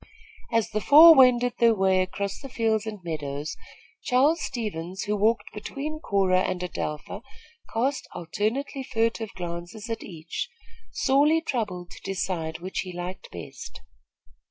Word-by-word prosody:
As 230 -2 +1
the 215 - -1
four 320 +6 +10
wended 250 -3 +5
their 230 -1 +5
way 190 -1 +3
across 200 +2 -3
the 275 - -9
fields 225 -3 0
and 210 -4 -6
meadows, 150 -3 -4 0.5
Charles 285 +6 +3
Stevens, 190 -6 -4
who 210 0 -1
walked 215 +3 +1
between 285 +8 -5
Cora 190 - +2
and 185 -1 -1
Adelpha, 155 +2 -4 0.5
cast 265 +5 -1
alternately 220 - -2
furtive 225 -3 -1
glances 175 +5 -6
at 225 - -3
each, 165 -2 -6 0.4
sorely 290 +4 +3
troubled 205 - -3
to - - -12
decide 180 -4 -3
which 185 +2 -4
he 185 - -4
liked 180 +1 -6
best. 85 -2 -9
210 Hz, 135 wpm, -26 LUFS, 180-245 Hz, 0.5 s, four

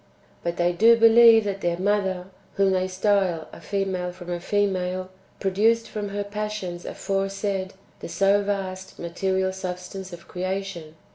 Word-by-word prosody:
But 170 0 -3
they 175 0 +2
do 230 +6 +6
believe 230 0 +7
that 195 -1 -3
their 170 -1 0
Mother, 190 -1 0 0.3
whom 195 -1 +3
they 185 0 +1
style 185 -3 +1
a - - -11
female 190 -3 -2
from 175 0 -9
a 175 - -2
female, 185 -1 -1 0.3
pro 195 - 0
duced 225 +4 +2
from 210 -1 -4
her 205 +1 -3
passions 205 -4 -5
aforesaid 195 -1 -2 0.2
the - - -7
so 200 +1 +3
vast 190 -2 -4
material 190 +2 -1
sub 185 -1 -4
stance 190 +1 -8
of 170 -1 -11
creation. 185 -3 -4
190 Hz, 155 wpm, -24 LUFS, 180-205 Hz, 0.3 s, believe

